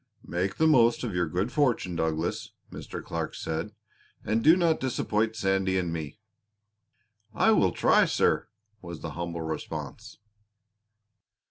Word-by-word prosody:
"Make 90 +3 -2
the 160 - +2
most 120 -7 +4
of 115 -5 -3
your 90 0 0
good 95 +7 -2
fortune, 120 - +1
Douglas," 80 0 -2 0.2
Mr. - - -7
Clark - - -4
said, 80 0 -4 0.5
"and 110 +2 0
do 160 +3 +7
not 170 -3 +2
disappoint 110 -3 -1
Sandy 95 -2 +1
and 90 -2 -1
me." 80 0 -5 1.2
"I 225 - +4
will 95 - +3
try, - - +4
sir!" - - +1 0.3
was 85 -3 -8
the 85 - -5
humble 85 +1 -4
response. 80 -1 -6
95 Hz, 135 wpm, -27 LUFS, 85-115 Hz, 1.2 s, do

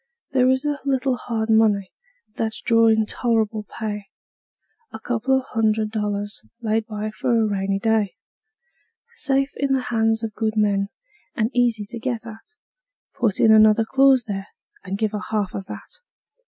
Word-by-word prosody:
There 255 -1 +3
is 260 +2 +1
a 290 -1 -1
little 265 -1 +1
hard 225 -2 -3
money 210 -3 +3 0.4
that's 220 -1 -2
drawin' 225 -1 +4
tol'rable 220 -2 -1
pay: 210 -2 -4 0.9
A 220 - -8
couple 245 +3 0
of 260 - -3
hundred 220 -1 +1
dollars 205 -1 -3 0.2
laid 220 -1 -1
by 215 -1 -4
for 230 +2 0
a 220 - +3
rainy 195 -1 -1
day; 215 -2 +1 1.0
Safe 275 - +1
in 275 -1 +1
the 265 - +2
hands 225 0 +2
of 220 -1 -3
good 220 0 -2
men, 200 -2 +2 0.5
and 220 +2 0
easy 235 -4 +1
to 235 - -6
get 235 -1 -3
at; 225 - -12 0.6
Put 225 -6 0
in 220 - +6
another 215 0 +6
clause 265 +1 +4
there, 195 -1 -4 0.4
and 195 +1 -4
give 215 -1 0
her 210 -1 -4
half 210 -3 -1
of 195 -1 -6
that. - - -10
220 Hz, 160 wpm, -22 LUFS, 210-240 Hz, 1.0 s, in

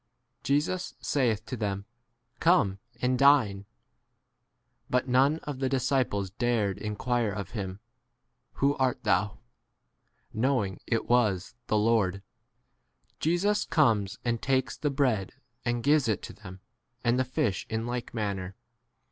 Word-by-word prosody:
Jesus 150 +7 0
saith 115 -6 0
to 130 - -4
them, 100 -3 -3 0.5
Come 130 - +3 0.2
and 125 0 +2
dine. 115 -9 +4 1.2
But 125 +1 +1
none 135 +5 +4
of 145 -3 -5
the 135 -1 0
disciples 130 -7 0
dared 110 -3 0
in 105 -1 -4
quire 120 -1 0
of 100 -3 -5
him, 95 -3 -5 0.7
Who 140 +1 +2
art 130 -2 0
thou 100 -1 +3
'? - - -26
13 110 - -3
knowing 120 -8 +1
it 115 -2 0
was 105 -7 +2
v - - -36
the 110 - +2
Lord. 105 -3 +2 1.0
Jesus 185 +6 +1
w - - -33
comes 110 -9 +3
and 115 -1 0
takes 130 -1 0
the 150 - -1
bread 125 -9 0 0.3
and 120 -1 -1
gives 145 -2 +4
it 110 -3 0
to - - -7
them, 95 0 -11 0.4
and 120 +1 +2
the - - +3
14 130 0 -16
fish 100 -4 0
in 110 +1 -2
like 120 0 -4
manner. 100 -4 -3
120 Hz, 150 wpm, -28 LUFS, 100-130 Hz, 1.2 s, dine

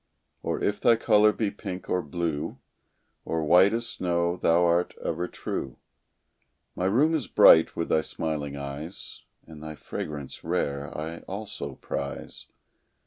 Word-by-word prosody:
Or - - -2
if 105 0 0
thy 120 - +6
color 105 -1 +5
be 105 -1 -1
pink, 95 -2 -7
or 90 - +1
blue, 80 -1 -3 0.7
Or 80 -1 -2
white 90 +5 +6
as 115 +1 -1
snow, 85 -3 0
thou 85 0 +3
art 85 +1 +1
ever 90 - -1
true; 65 -6 -5 1.0
My 90 - -1
room 135 +12 +3
is 150 -7 -1
bright 80 - +7
with 85 - -2
thy 80 - +3
smiling 75 -3 -3
eyes, 70 +5 -7 0.2
And 80 -2 -12
thy 80 0 -7
fragrance 75 -2 -6
rare 70 0 -1
I 80 +2 -5
also 100 +2 -5
prize. - - -6
85 Hz, 140 wpm, -27 LUFS, 75-100 Hz, 1.0 s, bright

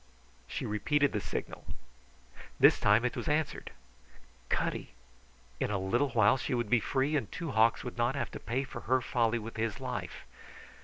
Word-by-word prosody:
She - - -4
repeated 145 +7 +1
the 105 - -2
signal. - - -5 1.0
This - - +6
time 105 +4 +4
it 125 - -1
was - - -4
answered. 150 -1 -1 0.8
Cutty! - - -2 0.6
In - - 0
a 105 - 0
little 120 +9 +1
while 110 0 +4
she 125 - -2
would 120 -2 -2
be 125 - +5
free, 135 +6 0
and 130 -8 -1
Two 170 -5 -4
Hawks 115 -1 +3
would 125 -1 -7
not 120 +3 +2
have 140 - -3
to - - -7
pay 125 +4 -2
for 130 -2 -7
her 130 0 +4
folly 120 -1 +1
with 115 0 -7
his 110 -1 -2
life. - - -5
120 Hz, 175 wpm, -31 LUFS, 110-135 Hz, 1.0 s, This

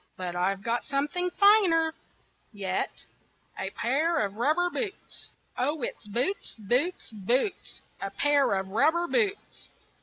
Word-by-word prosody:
But 180 -1 -4
I've 195 +2 0
got 235 +2 0
something 290 +6 -1
finer 360 -6 +5 0.6
yet 195 -3 -3 0.5
A - - -2
pair 310 +8 0
of 200 - -6
rubber 305 +11 +2
boots. 410 -2 -4 0.3
Oh, 290 +2 0
it's 220 - -5
boots, 250 - -1
boots, 245 - 0
boots, 240 - -1 0.2
A 195 - -2
pair 285 +2 +2
of 190 0 -2
rubber 320 - +3
boots! 405 +2 -1
275 Hz, 125 wpm, -28 LUFS, -, 0.6 s, finer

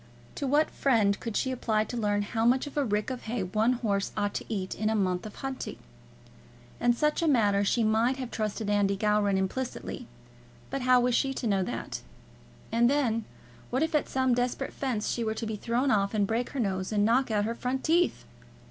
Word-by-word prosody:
To 280 - -3
what 295 +4 +3
friend 215 -7 +2
could 230 -3 -3
she 260 - 0
apply 220 -4 0
to 245 - -7
learn 205 -3 +1
how 225 +2 -2
much 250 +4 +3
of 290 - -9
a 290 - +2
rick 210 0 -1
of 255 - -6
hay 225 -2 -2
one 215 +6 +2
horse 205 -5 -1
ought 205 0 0
to - - -4
eat 190 -3 -2
in 215 0 -1
a 220 - +1
month 185 -1 0
of 210 - -11
hunting? 270 -1 -4 1.0
In 240 0 +3
such 300 +7 +1
a 335 - +1
matter 205 -8 +3
she 230 +3 +2
might 225 +4 +2
have 255 -3 -5
trusted 215 0 -2
Andy 200 -1 +2
Gowran 210 -1 +2
implicitly; 240 +4 -3 0.6
but 275 - -2
how 250 0 +5
was 245 0 +2
she 270 +2 +1
to 255 - -4
know 200 -3 +2
that? 185 - -4 0.7
And 235 +1 +4
then, 235 -6 +1 0.4
what 260 +5 +1
if 320 - -1
at 300 - +1
some 260 -1 +2
desperate 245 +2 -1
fence 245 -6 -2
she 235 - -1
were 220 -1 -1
to 225 - -4
be 220 0 -3
thrown 240 +6 0
off 200 -1 +1
and 205 -1 +3
break 230 +4 -1
her 280 - -5
nose 190 -4 -1
and 205 -1 +2
knock 245 +4 +3
out 210 -2 +1
her 230 - -1
front 255 +2 -3
teeth! 340 +2 +2
230 Hz, 215 wpm, -28 LUFS, 210-255 Hz, 1.0 s, how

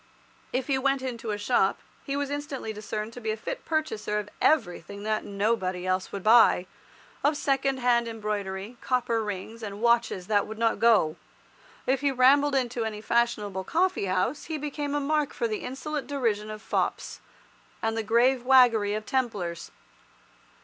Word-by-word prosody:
If 255 0 -1
he 270 -1 +1
went 275 0 +1
into 235 -3 -4
a 210 - -1
shop, 205 -2 +2 0.3
he 275 0 -3
was 285 -1 -2
instantly 285 -6 -4
discerned 215 +1 -5
to 245 - -9
be 220 - -3
a 215 - -1
fit - - -5
purchaser 265 -10 -1
of 210 0 -4
everything 200 - +1
that 215 0 -1
nobody 200 -3 -1
else 185 0 -1
would 200 -2 -5
buy, 220 -5 +6 0.6
of 290 +1 +2
second 270 -1 +1
hand 240 -2 +2
embroidery, 210 -1 -4
copper 240 -3 0
rings, 210 +3 -6
and 205 -2 -6
watches 235 -5 +2
that 205 0 +1
would 220 0 -7
not 230 0 +1
go. 215 -9 +4 0.7
If 265 +1 +1
he 285 - +2
rambled 275 +3 +4
into 245 -3 0
any 220 -1 -4
fashionable 210 -4 0
coffee 360 - +1
house, 185 +10 -1
he 315 - -3
became 290 0 -3
a - - +2
mark 295 0 0
for 235 - -1
the 215 -1 -3
insolent 280 +3 -4
derision 225 -7 -1
of 215 0 -8
fops, - - -2 0.6
and 225 0 0
the 225 - 0
grave 240 +3 +3
waggery 240 -6 +5
of 215 0 -4
Templars. 205 -11 -2
230 Hz, 170 wpm, -27 LUFS, 210-270 Hz, 0.7 s, buy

